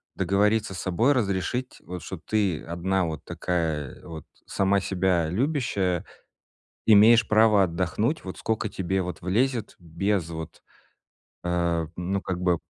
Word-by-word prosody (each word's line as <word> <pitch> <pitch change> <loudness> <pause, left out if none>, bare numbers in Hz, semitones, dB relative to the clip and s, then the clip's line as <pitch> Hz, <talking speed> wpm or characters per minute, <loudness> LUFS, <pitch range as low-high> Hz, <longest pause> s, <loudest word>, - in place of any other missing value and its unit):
договориться 100 +2 +1
с - - -6
собой, 110 +10 +2
разрешить 120 +2 -1
вот, 90 0 -7
что 95 - -6
ты 100 -2 0
одна 90 +2 -1
вот 80 -2 -5
такая 80 -5 -2
вот, 80 -2 -8 0.2
сама 100 0 +1
себя 90 -3 +1
любящая, 100 - 0 0.8
имеешь 110 +2 +7
право 110 -2 +5
отдохнуть 95 - -1
вот 95 - -7
сколько 110 -1 -2
тебе 95 0 -1
вот 90 0 -6
влезет 115 +5 0
без 85 +1 -1
вот, 80 -1 -8 0.8
э, 85 -2 0
ну, 90 +3 -2
как 90 -2 -4
бы 90 -2 +2
95 Hz, 130 wpm, -26 LUFS, 85-105 Hz, 0.8 s, имеешь